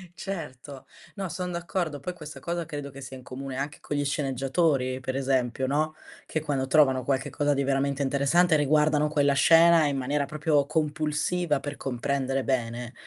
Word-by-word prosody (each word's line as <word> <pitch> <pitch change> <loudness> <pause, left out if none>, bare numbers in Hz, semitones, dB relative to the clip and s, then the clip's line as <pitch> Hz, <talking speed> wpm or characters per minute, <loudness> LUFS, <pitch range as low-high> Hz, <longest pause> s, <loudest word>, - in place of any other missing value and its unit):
Certo. 145 -9 -7 0.3
No, 195 -2 -3
son 180 +2 -4
d'accordo. 170 -3 -3
Poi 180 +6 -5
questa 155 -3 -10
cosa 170 0 -3
credo 145 -3 -6
che 140 +1 -11
sia 130 0 -8
in 130 - -13
comune 130 +1 -6
anche 140 +2 -4
con 145 - -3
gli 145 - 0
sceneggiatori, 135 -1 0
per 130 +1 -3
esempio, 130 -1 0
no, 155 +3 0 0.3
che 155 - -2
quando 140 -4 -1
trovano 135 -4 +4
qualche 135 +2 -1
cosa 145 +1 +1
di 140 0 0
veramente 140 +1 0
interessante 145 +5 +3
riguardano 150 +1 +3
quella 145 -2 +2
scena 165 +2 +6
in 140 -1 0
maniera 140 +2 0
proprio 150 -1 +1
compulsiva, 155 +1 0
per 145 0 -6
comprendere 135 +1 -2
bene. 120 -1 -2
145 Hz, 170 wpm, -27 LUFS, 135-155 Hz, 0.3 s, scena